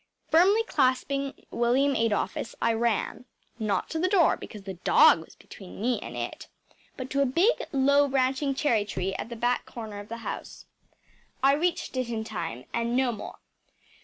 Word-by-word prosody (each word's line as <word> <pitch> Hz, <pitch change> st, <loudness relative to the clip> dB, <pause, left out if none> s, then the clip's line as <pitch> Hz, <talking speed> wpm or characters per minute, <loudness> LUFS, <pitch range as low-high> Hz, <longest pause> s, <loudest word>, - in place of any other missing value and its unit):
Firmly 390 Hz, +7 st, +5 dB
clasping 275 Hz, -, 0 dB
William 255 Hz, +4 st, +2 dB
Adolphus, 225 Hz, +1 st, -1 dB
I 230 Hz, -, +2 dB
ran 230 Hz, +1 st, -1 dB, 0.3 s
not 205 Hz, -4 st, -1 dB
to 320 Hz, -, -2 dB
the 365 Hz, -, +2 dB
door, 370 Hz, -4 st, +4 dB
because 210 Hz, -3 st, -10 dB
the 195 Hz, -1 st, -6 dB
dog 175 Hz, -2 st, +5 dB
was -, -, -18 dB
between 190 Hz, -3 st, -12 dB
me 240 Hz, +3 st, 0 dB
and -, -, -7 dB
it, -, -, -5 dB, 0.5 s
but 260 Hz, 0 st, -6 dB
to 280 Hz, -, +1 dB
a -, -, +4 dB
big, 345 Hz, -, +2 dB
low 280 Hz, +1 st, +4 dB
branching 270 Hz, +1 st, 0 dB
cherry 245 Hz, -7 st, +2 dB
tree 195 Hz, -2 st, -3 dB
at 215 Hz, -, -5 dB
the 235 Hz, -, -6 dB
back 245 Hz, +2 st, 0 dB
corner 220 Hz, -3 st, -7 dB
of 205 Hz, -, -10 dB
the 230 Hz, -, -5 dB
house. -, -, -6 dB, 0.8 s
I 275 Hz, +1 st, +6 dB
reached 335 Hz, 0 st, -1 dB
it 255 Hz, -2 st, -1 dB
in 225 Hz, -2 st, -2 dB
time 170 Hz, -, -5 dB
and 235 Hz, +1 st, -1 dB
no 260 Hz, -2 st, +2 dB
more. 220 Hz, -, -8 dB
245 Hz, 175 wpm, -27 LUFS, 220-280 Hz, 0.8 s, I